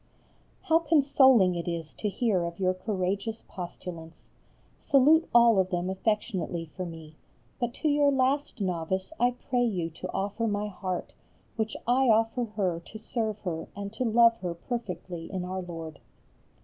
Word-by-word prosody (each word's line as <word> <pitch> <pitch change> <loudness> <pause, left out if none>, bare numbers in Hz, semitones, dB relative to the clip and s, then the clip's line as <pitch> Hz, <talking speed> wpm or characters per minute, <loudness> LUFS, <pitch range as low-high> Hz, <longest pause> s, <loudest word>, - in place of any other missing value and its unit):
How 325 0 +4
consoling 270 - +5
it 170 0 -4
is 165 -2 -4
to 210 - -2
hear 205 -4 +1
of 170 +1 -5
your 185 -1 +2
courageous 195 +3 -2
postulants! 175 -2 -8 0.5
Salute 300 +4 +4
all 235 -3 +6
of 185 -1 +2
them 180 0 -1
affectionately 190 -4 -1
for 185 -2 -4
me, 160 -2 -10 0.4
but 240 -1 -1
to 315 - -1
your 290 -1 +4
last 270 0 0
novice 190 - -2
I 245 - +4 0.2
pray 245 -1 +3
you 180 -8 -1
to 160 - -7
offer 205 +4 -2
my 210 0 -1
heart, 185 -2 -4 0.4
which 220 -1 -2
I 255 +3 +3
offer 225 +2 +3
her 195 -6 -1
to 170 +6 -11
serve 220 -1 -3
her 165 -4 -4
and 200 +1 -6
to 225 - -2
love 230 0 +5
her 175 -4 -4
perfectly 180 -5 -5
in 185 -2 -3
Our 185 +1 -3
Lord. 165 -4 -7
200 Hz, 160 wpm, -28 LUFS, 180-235 Hz, 0.5 s, all